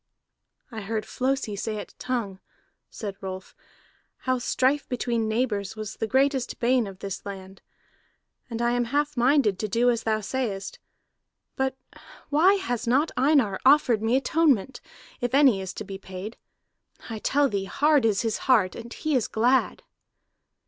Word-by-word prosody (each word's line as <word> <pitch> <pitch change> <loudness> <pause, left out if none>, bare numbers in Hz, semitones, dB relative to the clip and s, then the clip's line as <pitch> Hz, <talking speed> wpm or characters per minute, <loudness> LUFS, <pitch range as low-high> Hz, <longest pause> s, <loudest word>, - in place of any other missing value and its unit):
"I 220 -2 -6
heard 215 +2 -3
Flosi 260 -5 -1
say 215 +1 -3
at - - -8
Tongue," 225 -7 -3 0.5
said 200 -3 -6
Rolf, 190 -1 -7 0.7
"how 255 -1 +1
strife 265 +3 +1
between 235 -2 -1
neighbors 220 -3 -1
was 215 -1 -6
the 220 - -2
greatest 265 +1 +1
bane 245 -2 +2
of 195 -1 -9
this 195 -1 -6
land. 190 -1 -9 0.9
And 230 0 -3
I 240 - +2
am 245 0 +1
half 290 +4 -1
minded 245 -5 +3
to 215 - -1
do 235 +4 +3
as 235 -1 -1
thou 220 -1 0
sayest. 210 -3 -4 0.8
But 265 0 -1 0.5
why 335 +7 +5
has 245 - -3
not 275 +7 +2
Einar 260 -7 +3
offered 260 -5 +5
me 225 +3 +2
atonement, 270 -4 +1 0.4
if 245 +1 -1
any 265 -9 +5
is 190 -1 -5
to - - -5
be 195 -1 -8
paid? 190 +3 -8 0.7
I 225 -2 -5
tell 285 +5 +2
thee, 200 -5 -2
hard 295 +5 +3
is 215 -2 +2
his 225 -1 -1
heart, 210 -8 +4
and 235 0 -9
he 310 +3 -2
is 250 -5 +2
glad!" 245 +4 +1
235 Hz, 155 wpm, -26 LUFS, 210-265 Hz, 0.9 s, why